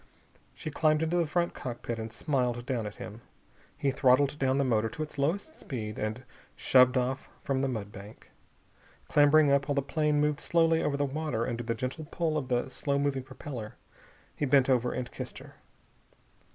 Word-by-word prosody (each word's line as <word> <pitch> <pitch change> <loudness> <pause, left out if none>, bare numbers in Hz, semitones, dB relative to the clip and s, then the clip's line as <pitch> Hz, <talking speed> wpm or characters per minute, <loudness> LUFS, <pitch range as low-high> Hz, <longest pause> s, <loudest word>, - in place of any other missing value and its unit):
She 155 - -6
climbed 155 +1 +2
into 165 +2 +1
the 170 -2 +2
front 170 +3 0
cockpit 120 -1 -5
and 110 0 -5
smiled 120 -1 -1
down 120 -5 -2
at 105 - -8
him. 110 +2 -9 0.6
He 140 - +1
throttled 135 +2 +3
down 135 0 +2
the 140 - +3
motor 115 -4 +1
to 155 - -4
its 150 -2 -9
lowest 195 - -1
speed 110 -5 -5
and 110 +4 -3 0.3
shoved 130 0 +5
off 130 +2 -1
from 135 -2 0
the 135 - +1
mud 110 -6 -4
bank. 105 0 -12 0.8
Clambering 145 0 +5
up, 140 0 +3
while 145 - 0
the 140 - +1
plane 150 +1 +1
moved 150 0 +1
slowly 165 -1 +3
over 140 -1 0
the 145 - +1
water 140 -5 -2
under 120 0 -2
the 115 0 -2
gentle 130 +7 -4
pull 165 -2 -1
of 145 -4 -1
the 125 0 0
slow 140 +2 -1
moving 140 -1 0
propeller, 130 -4 -8 0.6
he - - -4
bent 135 -1 +4
over 125 -1 +2
and 125 -1 -4
kissed - - -7
her. - - -13
135 Hz, 190 wpm, -29 LUFS, 120-150 Hz, 0.8 s, shoved